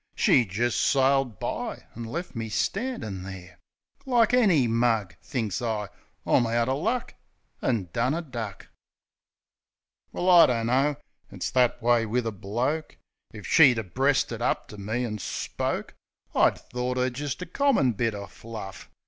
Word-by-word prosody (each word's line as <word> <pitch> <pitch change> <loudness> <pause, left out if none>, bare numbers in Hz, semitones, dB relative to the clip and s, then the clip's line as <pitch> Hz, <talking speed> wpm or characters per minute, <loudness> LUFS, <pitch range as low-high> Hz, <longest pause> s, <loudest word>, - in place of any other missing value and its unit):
She 125 - +4
jist 115 +5 0
sailed 135 -4 +2
by - - -4
an' 115 0 -7
lef 140 +3 -5
me 115 -1 -4
standin' 195 - -2
there 90 -2 -10 0.4
Like 245 -4 +3
any 195 - +4
mug. 115 -5 +1
Thinks 115 -8 -3
I, 110 -4 -2 0.4
"I'm 120 - +3
out 115 +1 +1
er 130 - +1
luck," 225 - -1 0.5
An' 110 -8 0
done 125 +5 +1
a 170 - -2
duck. 115 - -7 1.4
THE - - -12
INTRO - - -2
31 - - 0
Well, - - +4
I - - +9
dunno. 125 +5 +1 0.4
It's - - -4
that 125 -2 +2
way 120 -1 +3
wiv 120 +2 0
a 115 - -1
bloke. 120 +10 -3 0.3
If 105 -3 -10
she'd 135 -7 +6
ha' 105 -5 -5
breasted 130 -4 +1
up 125 - -1
ter 105 - -10
me 110 +5 -2
an' 105 -2 -4
spoke, - - -3 0.4
I'd - - +4
thort 125 +1 -4
'er 130 0 +1
jist 145 +5 -4
a - - -6
commit! 180 - +2
bit 115 0 0
er 100 0 -6
fluif. 105 -3 -9
120 Hz, 165 wpm, -26 LUFS, 110-135 Hz, 1.4 s, I